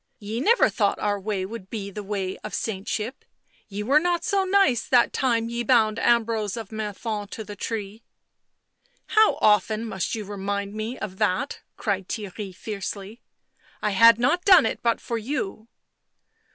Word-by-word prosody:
" - - -48
Ye 215 +2 -5
never 450 - +4
thought 205 -3 0
our 205 -1 -1
way 195 -1 -2
would 195 -2 -8
be 200 -3 -5
the 210 - -6
way 195 -2 -3
of 215 - -6
saintship 215 +4 -3 0.2
— - - -40
ye 205 0 -5
were 275 +7 +4
not 345 0 0
so 400 -3 +1
nice 375 - +3
that 245 -2 +4
time 230 -3 +1
ye 235 +1 -3
bound 225 -2 +3
Ambrose 225 -3 +1
of 225 -3 -7
Menthon 215 0 -4
to 220 - -7
the 205 0 -9
tree." 210 +1 -5 0.6
" - - -43
How 435 0 +6
often 215 +2 +3
must 195 -3 -2
you 215 -2 -5
remind 200 0 -3
me 220 +4 -4
of 190 -3 -6
that?" 210 +6 0 0.2
cried 195 -4 -2
Theirry 205 -2 -5
fiercely. 205 +2 -6 0.3
" - - -32
I 210 - +1
had 230 +3 +7
not 280 +9 +1
done 375 - +7
it - - -1
but 230 -1 +1
for 235 -1 -3
you." 225 -3 -4
215 Hz, 180 wpm, -25 LUFS, 205-235 Hz, 0.6 s, had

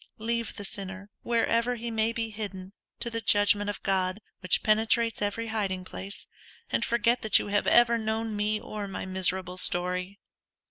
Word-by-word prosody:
Leave 230 0 -2
the 205 - -6
sinner, 195 0 -7
wherever 235 +1 +1
he 235 0 -5
may 220 0 +1
be 230 -1 -3
hidden, 195 -3 -7 0.3
to - - 0
the 230 0 -2
judgment 205 0 +4
of 205 - -5
God, 190 0 0 0.2
which 185 - +1
penetrates 220 +1 +2
every 215 +3 -2
hiding 195 -4 -2
place; 195 +2 -6 0.5
and - - +1
forget 235 +1 +2
that 215 -2 +5
you - - -3
have 205 0 +1
ever 235 -1 +5
known 220 0 -2
me, 210 +1 0
or 210 -1 -6
my 195 - -5
miserable 185 -1 -1
story. 180 +2 +2
210 Hz, 170 wpm, -28 LUFS, 190-225 Hz, 0.5 s, that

